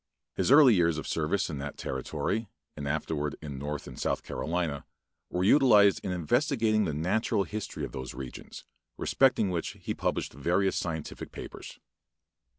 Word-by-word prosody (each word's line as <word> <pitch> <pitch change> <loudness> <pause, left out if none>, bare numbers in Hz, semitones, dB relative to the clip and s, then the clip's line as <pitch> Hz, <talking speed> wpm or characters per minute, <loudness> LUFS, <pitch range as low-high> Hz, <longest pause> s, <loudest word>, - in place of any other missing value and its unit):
His - - 0
early 140 -3 +8
years 85 -4 +3
of 80 - -4
service 85 +5 0
in 75 -5 -5
that 70 +1 -6
territory, 100 - -2 0.3
and 70 -1 -5
afterward 75 0 -2
in 70 -4 -7
North 75 +1 -4
and - - -10
South - - -1
Carolina, 80 -4 -2 0.5
were 90 - -1
utilized 105 -4 +6
in 95 - -2
investigating 110 - +1
the 80 - -2
natural 100 +6 +1
history 105 0 -5
of - - -9
those 65 -2 -6
regions, 65 -1 -8 0.3
respecting 130 -7 +3
which 85 -2 -3
he - - -3
published - - -2
various 90 +7 +1
scientific 80 -3 -4
papers. - - -9
90 Hz, 155 wpm, -29 LUFS, 75-105 Hz, 0.5 s, early